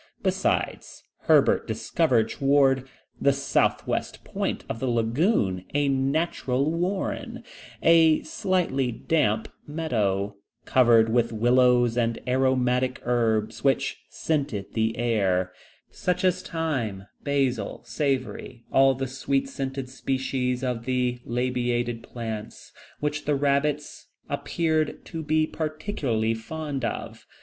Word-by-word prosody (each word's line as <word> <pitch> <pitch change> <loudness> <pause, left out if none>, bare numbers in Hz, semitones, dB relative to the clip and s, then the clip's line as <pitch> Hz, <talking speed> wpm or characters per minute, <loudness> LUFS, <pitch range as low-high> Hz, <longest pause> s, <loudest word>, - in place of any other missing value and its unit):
Besides, - - -1 0.2
Herbert - - +4
discovered 110 -1 +1
towards 135 -2 +2 0.3
the 140 - +5
southwest 140 0 0
point - - -3
of - - -4
the 130 - -2
lagoon 115 - +1
a 145 -1 +2
natural 135 0 0
warren, 180 +4 -2 0.4
a 160 -1 +5
slightly 180 - 0
damp 115 -4 0 0.2
meadow, 105 -11 -1 0.3
covered 115 -3 +5
with 120 0 +2
willows 120 +1 +3
and 115 -1 0
aromatic 130 0 +1
herbs 115 -2 0
which 135 -1 +1
scented 140 -11 -2
the 110 0 0
air, 95 -6 +1 0.4
such 180 +1 -1
as 185 0 +2
thyme, 130 - -3 0.2
basil, 135 -7 -1
savory, 130 -5 -2
all 135 0 +5
the 135 +1 -2
sweet 270 - -1
scented 135 - -4
species 130 -1 -2
of 125 -3 -2
the 125 -1 0
labiated 120 -1 -1
plants, 110 -3 -7 0.3
which 150 0 -2
the 150 - +2
rabbits 145 +1 0 0.2
appeared 160 -2 -1
to 165 -2 -5
be 155 0 +2
particularly 155 - -2
fond 140 +4 -5
of. 115 - -5
130 Hz, 110 wpm, -26 LUFS, 115-150 Hz, 0.4 s, the